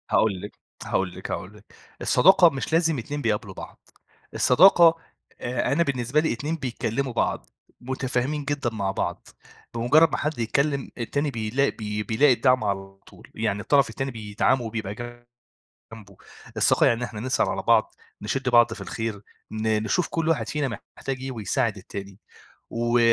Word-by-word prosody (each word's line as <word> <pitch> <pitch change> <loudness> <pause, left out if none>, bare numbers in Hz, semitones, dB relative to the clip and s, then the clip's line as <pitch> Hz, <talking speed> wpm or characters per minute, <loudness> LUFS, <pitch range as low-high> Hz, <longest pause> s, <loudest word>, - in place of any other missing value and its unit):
هاقول 100 -5 +2
لِك، 105 - -9 0.3
هاقول 95 -2 -1
لِك، - - -7
هاقول - - -5
لِك. - - -19 0.4
الصداقة 190 -2 +6
مش 135 0 -5
لازم 165 -2 +3
اتنين 145 +5 -5
بيقابلوا 105 -5 -1
بعض، - - -12 0.4
الصداقة 170 +3 +6 0.5
آآ، 120 +1 -1
أنا 165 +5 +3
بالنسبة 130 -1 0
لي 160 -4 +1
اتنين 145 +8 -3
بيتكلموا 130 -2 -3
بعض، 60 - -1 0.3
متافهمين 130 +3 -2
جدًا 140 -3 -1
مع 100 -3 -1
بعض، - - -4 0.5
بمُجرّد 135 +8 +4
ما - - -1
حد 150 -3 -3
يتكلم 140 +4 0
التاني 140 +5 -2
بيلاق 115 +4 0
بي 105 -1 -3
بيلاقي 125 +7 +4
الدّعم 125 0 +2
على 95 -1 -3
طول، - - -17
يعني 105 -2 -1
الطرف 140 +5 +3
التاني 135 0 -4
بيدعمه 110 +3 0
وبيبقى 110 -3 -4 1.0
جنبه، 100 -4 -13 0.4
الصداقة - - +4
يعني 115 - +3
إن - - -6
إحنا 110 -3 -7
نسأل 130 +3 +1
على - - -2
بعض، - - +3 0.3
نشد 130 +5 -2
بعض 120 -2 +5
في 110 - -12
الخير، 105 +2 -4 0.3
ن 110 0 0
نشوف 170 +11 0
كل 165 -1 -2
واحد 165 - 0
فينا 140 -8 -2 0.2
محتاج 135 -1 -3
إيه 135 0 -4
ويساعد 110 -1 -1
التاني، 100 0 -9 0.5
و 120 +1 +1
120 Hz, 160 wpm, -25 LUFS, 110-140 Hz, 1.0 s, الصداقة